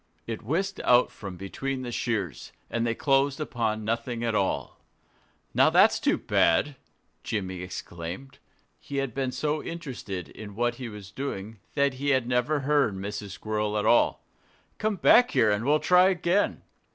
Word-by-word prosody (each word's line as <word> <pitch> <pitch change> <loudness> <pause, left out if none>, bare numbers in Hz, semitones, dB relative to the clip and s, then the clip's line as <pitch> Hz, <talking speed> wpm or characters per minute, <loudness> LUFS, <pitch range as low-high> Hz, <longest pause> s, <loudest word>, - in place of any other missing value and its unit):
It 115 -2 -5
whisked 190 - -2
out 125 0 +4
from 95 -3 -8
between 130 +8 -4
the 120 - -5
shears; 105 - -3 0.2
and 115 0 0
they 115 - 0
closed 135 +1 +2
upon 110 -7 -2
nothing 115 +1 -2
at 115 -1 0
all. 100 -2 -1 0.7
"Now, - - +5
that's - - +5
too - - +2
bad!" 140 - +2 0.5
Jimmy 95 -4 -3
exclaimed. 90 +6 -7 0.4
He 140 - -6
had 135 -4 -1
been 130 0 -1
so 150 +3 -1
interested 130 - -6
in 105 -2 -10
what 120 +1 0
he 120 - -4
was 105 -2 -10
doing 110 -4 -5 0.2
that 140 -1 +2
he 145 - 0
had 130 -4 +2
never 125 +4 +1
heard 140 -7 +2
Mrs. 100 +1 -5
Squirrel 105 0 -2
at 105 - 0
all. - - +3 0.5
"Come 215 0 0
back 245 +6 +6
here 110 - +3
and 105 +3 0
we'll 150 +2 +4
try 180 +3 +5
again." 185 +1 +1
120 Hz, 165 wpm, -27 LUFS, 105-140 Hz, 0.7 s, back